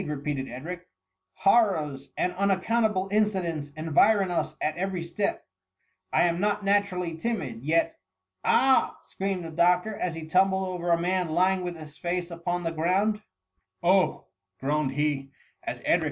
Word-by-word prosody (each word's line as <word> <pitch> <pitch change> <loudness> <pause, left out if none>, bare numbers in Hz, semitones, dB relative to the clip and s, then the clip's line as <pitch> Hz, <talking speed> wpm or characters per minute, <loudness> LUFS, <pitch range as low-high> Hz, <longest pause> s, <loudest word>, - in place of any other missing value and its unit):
repeated 140 -2 -3
Edric; 175 +8 -7 0.3
" 95 0 -58
hor 205 +1 +5
rors 140 -3 -5
and 180 - 0
unaccountable 200 +1 +1
incidents 185 -8 0
environ 185 +5 +3
us 155 -2 -1
at 155 - -1
every 185 -1 -2
step; 170 +4 -2 0.7
I - - +3
ani 170 0 +1
not 205 0 0
naturally 195 -4 +1
timid, 160 - -3
yet—*" 165 +3 +2
^^ - - -30 0.5
Ah 265 0 +3
!^^ - - -29
screamed 190 -2 -3
the 165 - -6
doctor, 180 +5 +2
as 175 -4 -2
he 165 -1 -6
tumbled 190 +3 +2
over 175 -1 -3
a 170 0 +4
man 180 0 0
lying 185 +3 +2
with 175 -1 -4
his 155 -1 -12
face 175 0 -2
upon 175 +1 -3
the 165 - -1
ground; 190 +7 +1 0.3
" 95 - -48
Oh - - +6
r - - -17 0.4
groaned 145 0 0
he, 145 -1 -1 0.3
as - - -4
Edric - - -9
and. - - +4
175 Hz, 170 wpm, -27 LUFS, 155-195 Hz, 0.7 s, Oh